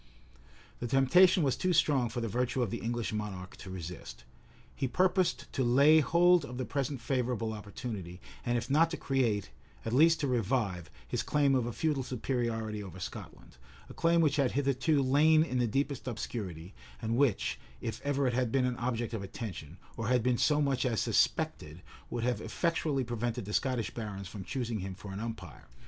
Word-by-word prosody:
The 120 - -3
temptation 165 +8 +5
was 135 -3 +2
too 185 -1 0
strong 140 -6 +3
for 120 +2 -4
the 115 - -1
virtue 125 +4 0
of 110 - -3
the 115 - -3
English 120 -1 -2
monarch 100 -3 -5
to 95 - -10
resist. 90 -7 -8 0.5
He 135 - -1
purposed 180 -4 +1
to 135 - 0
lay 140 +6 +6
hold 175 +3 +4
of 125 -3 -7
the 130 - -2
present 140 0 -2
favorable 120 -3 -1
opportunity, 105 -4 -7 0.2
and 120 0 +1
if 120 - -3
not 160 +4 +4
to 165 - -4
create, 115 - 0 0.3
at 115 - -2
least 160 +5 +5
to 145 - +1
revive, 110 - -1 0.2
his - - -1
claim 145 -2 +2
of 125 -3 +1
a - - -2
feudal 150 +2 0
superiority 115 -4 -2
over 95 -2 -9
Scotland; 90 - -9 0.3
a - - -9
claim 170 0 +3
which 150 -2 +2
had 135 -4 +2
hitherto 140 +1 +2
lain 155 +4 +5
in 130 -6 -2
the 120 - +2
deepest 135 +2 -2
obscurity, 100 -7 -5 0.3
and 115 0 -1
which, 130 -5 +1 0.2
if 115 - -5
ever 140 -1 0
it 125 - +1
had 125 -2 0
been 130 0 +2
an 125 -1 -1
object 120 -1 -2
of 110 - -3
attention, 95 -5 -7 0.2
or 115 - -3
had 125 -1 +2
been 125 -1 +1
so 150 -1 +3
much 140 -3 +1
as 120 -4 0
suspected, 80 +4 0 0.3
would 120 -1 -3
have 125 0 0
effectually 160 -5 0
prevented 120 -1 -3
the 105 - -6
Scottish 130 -3 0
barons 100 -4 -5
from 100 +1 -7
choosing 120 0 -3
him 95 0 -5
for 100 0 -9
an 100 - -5
umpire. 115 0 -7
125 Hz, 190 wpm, -31 LUFS, 110-140 Hz, 0.5 s, lay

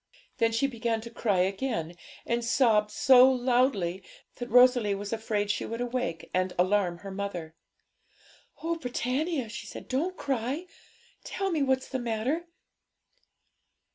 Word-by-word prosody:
Then 230 -1 +3
she 230 +4 +1
began 235 -3 -1
to 235 +1 -9
cry 205 -5 +1
again, 190 -3 -2 0.3
and 235 0 -1
sobbed 225 -3 +3
so 260 +1 +6
loudly 245 -8 +1 0.3
that 245 -1 -6
Rosalie 245 -4 +5
was 205 +2 -5
afraid 215 -2 -1
she - - -2
would 230 +1 -5
awake 245 -9 -3
and 185 0 0
alarm 180 -1 +2
her 195 - -5
mother. 190 -5 -5 1.1
'Oh, 335 0 -1
Britannia,' 260 +1 -2
she 215 - -8
said, - - -9
'don't 325 +8 -1
cry! 270 +5 -2 0.6
Tell 390 -1 -2
me 320 -3 0
what's 265 -1 +1
the 260 - -3
matter?' 245 +9 -2
235 Hz, 140 wpm, -28 LUFS, 205-260 Hz, 1.1 s, so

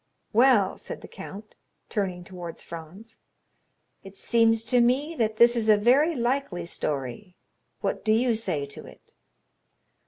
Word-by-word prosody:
"Well," 230 -4 +4
said - - -8
the - - -10
count, 200 +2 -10 0.3
turning 185 -4 -3
towards 175 -2 -9
Franz, 170 +7 -11 0.8
"it 195 0 -13
seems 225 0 +2
to 245 +1 +2
me 265 +7 +1
that 220 -1 0
this 235 +1 +6
is 225 -2 0
a 210 - +7
very 275 +10 +3
likely 240 -8 -1
story. 150 - -4 0.5
What - - -2
do 215 - +1
you 235 +2 +3
say 160 -10 -2
to 140 - -9
it?" - - -17
215 Hz, 145 wpm, -26 LUFS, 180-240 Hz, 0.8 s, a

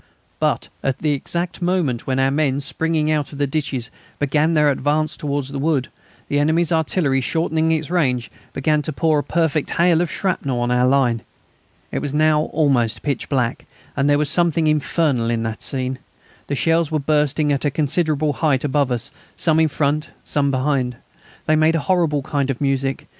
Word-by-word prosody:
But - - 0
at 135 -2 -1
the 150 - 0
exact 170 +6 -3
moment 175 -9 0
when 130 -1 0
our 135 0 +2
men, 140 -2 +1
springing 155 +2 -1
out 150 -2 -1
of 145 - -9
the 145 - +1
ditches, 135 -4 -3 0.3
began 150 +3 +1
their 150 -1 +4
advance 150 +3 0
towards 140 -2 -3
the 140 0 -5
wood, 145 -3 0 0.4
the 145 - +1
enemy's 160 +3 +2
artillery, 155 -4 +1
shortening 160 +3 0
its 160 0 -1
range, 130 -9 0 0.2
began 150 +2 +1
to 155 - -4
pour 155 +1 +2
a - - -2
perfect 160 -3 0
hail 170 -1 +3
of 175 - -1
shrapnel 140 -10 -1
on 120 0 0
our 125 0 +3
line. 130 -4 +2 0.7
It - - -1
was 145 0 -4
now 155 0 +3
almost 135 -7 +1
pitch 140 -4 -2
dark, 125 -3 -1 0.3
and 140 +1 +1
there 145 - +4
was 150 0 +1
something 170 -2 +2
infernal 150 -5 +1
in 115 -1 0
the 110 -1 -2
scene. 130 -1 -2 0.5
The 140 - -1
shells 165 +2 +2
were 155 - 0
bursting 150 0 +1
at 140 - -2
a 145 - +2
considerable 150 +1 0
height 140 -5 +1
above 140 -2 +1
us, 125 +4 -1 0.3
some 160 -1 +2
in 160 - +4
front, 150 0 -1
some 140 -1 0
behind. 130 -2 0 0.5
They 155 - +3
made 155 +1 +3
a - - +2
horrible 160 -4 +1
kind 140 -1 -1
of 135 - -2
music. 135 -1 -1
145 Hz, 185 wpm, -20 LUFS, 135-155 Hz, 0.7 s, their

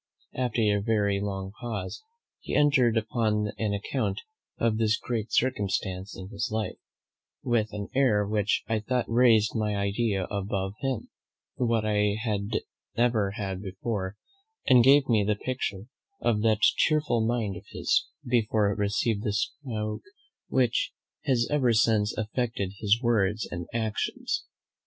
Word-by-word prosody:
After 125 -3 -1
a 105 -1 +2
very 100 -2 +1
long 95 -1 -3
pause 110 - -5 0.4
he - - -4
entered 130 -6 +4
upon 110 -2 0
an 105 -2 0
account 100 -1 -2 0.4
of 115 -1 +1
this 110 0 +3
great 115 -2 -3
circumstance 100 -5 -1
in 95 0 -8
his 105 +2 -3
life, 110 0 -2 0.6
with 115 -4 +1
an 105 -1 -5
air 125 -7 +3
which 105 -1 +1
I 110 -1 +1
thought 125 +3 -1
raised 115 -3 +4
my 105 -2 0
idea 100 0 0
of 100 +1 -3
him 105 +6 -2 0.5
above 125 -2 0
what 115 -2 +1
I 105 -1 +2
had 105 -2 -1 0.4
ever 115 -5 +2
had 95 -2 -3
before; 95 0 -4 0.5
and 125 -2 +6
gave 135 +2 +6
me 110 -4 +3
the 105 +1 +1
picture 105 -4 -3 0.3
of 105 -3 +1
that 110 -1 +2
chearful 150 -7 +3
mind 110 -4 0
of 85 - -10
his, - - +1 0.2
before 110 -4 +2
it 100 - -4
received 105 +1 0
that 105 - 0
stroke 110 -2 -3 0.5
which 125 -3 +1 0.3
has 120 -3 +2
ever 130 -5 +3
since 110 -1 +3
affected 110 -2 -2
his 105 +1 +3
words 110 -2 +1
and 85 -1 -5
actions. 110 -2 -2
110 Hz, 145 wpm, -27 LUFS, 100-120 Hz, 0.6 s, and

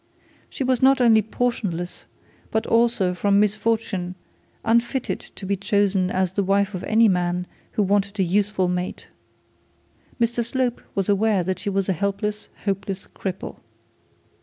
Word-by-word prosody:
She - - -3
was 255 -1 +1
not 270 +1 +5
only 230 -3 +6
portionless, 205 -6 -3 0.4
but 220 - 0
also 230 -6 +2
from 200 +2 +2
misfortune 210 -3 0 0.5
unfitted 235 +3 +1
to 195 - -11
be 200 +1 0
chosen 200 -1 +1
as 185 -1 0
the 200 - +1
wife 200 +1 +1
of 185 - -5
any 225 +1 +5
man 180 -2 0 0.3
who 210 - +2
wanted 200 +1 0
a - - +4
useful 195 +1 +1
mate. 180 0 -3 1.1
Mr 235 0 +1
Slope 245 0 -1
was 195 -2 0
aware 205 -1 +2
that 185 +1 -2
she 205 - -3
was 195 -1 0
a 190 - +2
helpless 200 +4 -2 0.2
hopeless 195 -1 -2
cripple. 190 -1 -5
200 Hz, 145 wpm, -23 LUFS, 190-225 Hz, 1.1 s, only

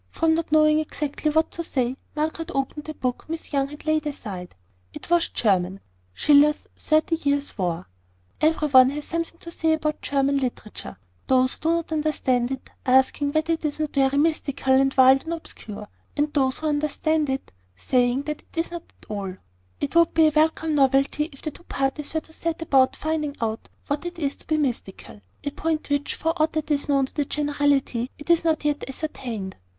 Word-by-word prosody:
From 325 0 +2
not 325 -2 -2
knowing 305 0 +5
exactly 305 0 -2
what 315 +1 +2
to 335 - -4
say, 255 -5 -1 0.2
Margaret 320 +2 -2
opened 275 +2 -2
the 310 - -6
book 250 -2 -3
Miss 325 -1 -6
Young 275 -1 +2
had 295 +1 -11
laid 310 -1 +1
aside. 195 -11 -6 0.4
It - - -9
was 345 -1 +3
German 190 -3 +1 0.3
Schiller's 295 - +4
Thirty 315 +1 +1
Years' 285 -2 -1
War. 175 -3 -2 0.5
Every 310 0 +3
one 260 -1 +7
has 290 +2 -4
something 335 0 -3
to 335 - -9
say 320 -1 +1
about 305 -1 -1
German 280 0 +1
literature; 245 -5 -5 0.3
those 255 0 +3
who - - -16
do 320 - 0
not 335 -1 -2
understand 275 -6 +1
it 265 -1 -6
asking 265 +2 +3
whether 315 +1 +2
it 325 - -4
is 300 0 -2
not 305 -1 -2
very 270 0 +2
mystical, 285 -3 +1
and 270 +1 +4
wild, 265 +1 +7
and 330 - -3
obscure; 215 -10 -8 0.3
and 295 +1 +1
those 265 -3 +2
who 315 - -6
do - - +2
understand 300 +1 0
it 265 0 -3 0.2
saying 245 - +1
that 300 0 -4
it - - -23
is 330 +1 0
not 345 -1 -5
so - - -31
at - - -16
all. 195 -2 -4 0.4
It 285 +2 -3
would 335 -1 +4
be 320 - +6
a 310 - +3
welcome 315 0 +2
novelty 275 +2 +2
if 275 - -15
the 310 - -3
two - - -16
parties 275 +2 -2
were 315 - -1
to 320 - -17
set 330 0 -3
about 265 -4 +3
finding 305 -2 -2
out 225 -1 -3 0.2
what 290 +4 -2
it 350 0 -7
is 285 -4 -1
to - - -17
be 310 - +1
mystical, 235 -7 -4 0.2
a 285 - -2
point 310 0 -2
which, 285 0 0
for 325 0 0
aught 315 - +2
that 310 0 -2
is 285 0 0
known 275 -1 +3
to - - -13
the 290 - 0
generality, 285 -4 0 0.2
is 340 -1 +4
not 320 -2 +1
yet 295 -1 0
ascertained. 240 -9 -5
290 Hz, 200 wpm, -24 LUFS, 265-315 Hz, 0.5 s, one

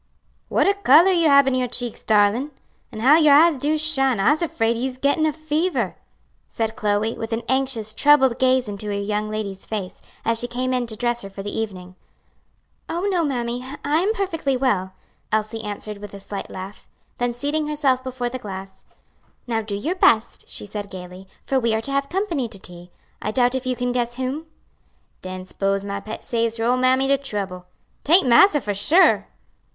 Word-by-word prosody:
"What - - +2
a 400 - +4
color 370 -2 +5
you 340 -3 +3
hab 280 -2 +6
in 265 - +2
your 255 -1 0
cheeks, 245 -1 -4
darlin'! 215 +6 +2 0.4
an' 215 - -7
how 280 +6 +6
your 300 -3 +6
eyes 315 -1 +5
do 300 +3 +1
shine. 270 -6 +3
I'se 295 - +3
'fraid 225 0 +1
you's 255 +2 -3
gettin' 285 +4 +2
a - - +1
fever," 310 +4 -1 0.5
said 225 -1 -3
Chloe, 210 +2 0
with 225 0 -5
an 230 +1 -2
anxious, 260 -5 0
troubled 265 -1 +4
gaze 255 -1 +3
into 205 0 -5
her 205 - -2
young 210 +1 -2
lady's 205 -3 -5
face, 200 -4 -5 0.2
as 230 0 +2
she 245 - -2
came 255 +1 -2
in 250 -1 -1
to 220 - -4
dress 240 +1 -1
her 195 - -8
for 195 0 -8
the 205 - -5
evening. 185 -5 -5 1.0
"Oh, 340 - -2
no, 350 -3 +1
mammy, 245 -4 -2 0.2
I 300 +2 +2
am 390 +5 +1
perfectly 325 - -1
well," 195 -8 0 0.4
Elsie 215 +1 -1
answered 210 0 -6
with 205 -1 -9
a - - -9
slight 195 0 -6
laugh. 190 +2 -9 0.3
Then 245 0 0
seating 295 +4 -1
herself 280 -4 +1
before 255 -2 -3
the 255 +1 -6
glass, 195 -3 -9 0.6
"Now 225 -2 -1
do 210 -2 -5
your 295 - -2
best," 235 -11 +2
she - - -7
said 205 0 -6
gayly, 185 0 -10 0.2
"for 270 - +1
we 230 -3 +1
are 220 - -1
to 275 - -3
have 275 0 -1
company 345 - -1
to 210 - -7
tea. 175 -1 -9 0.3
I - - -2
doubt 245 +3 +2
if 260 0 -3
you 255 - 0
can 245 0 -2
guess 240 -1 -1
whom?" 265 +5 -4 0.7
"Den 185 0 -7
'spose 195 +1 -1
my 200 0 -4
pet 215 +2 -8
saves 230 -1 -1
her 225 - -1
ole 250 +2 +2
mammy 255 +1 +3
de 275 0 +2
trouble. 195 -8 -5 0.4
'Taint 335 0 +4
massa, 295 +7 +6
for 205 - -2
sure?" 315 - +4
240 Hz, 200 wpm, -22 LUFS, 210-275 Hz, 1.0 s, hab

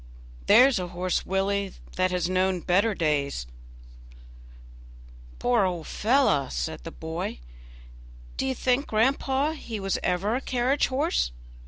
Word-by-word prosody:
"There's 260 -4 +6
a 180 - -3
horse, 180 +1 -2
Willie, 195 0 0 0.2
that 185 0 +2
has 180 -2 -1
known 185 0 +1
better 200 +5 +2
days." 145 - -1 1.9
"Poor 245 -4 +2
old 175 -4 -2
fellow!" 220 - +2
said 160 - -4
the 165 - -7
boy, 160 - -5 1.0
"do 135 - -1
you 130 - -1
think, 255 +3 +1
grandpapa, 265 +6 +1
he 235 -8 -6
was 195 -1 -1
ever 180 +4 0
a 260 - -1
carriage 255 +3 +1
horse?" 275 - 0
195 Hz, 130 wpm, -26 LUFS, 175-250 Hz, 1.9 s, There's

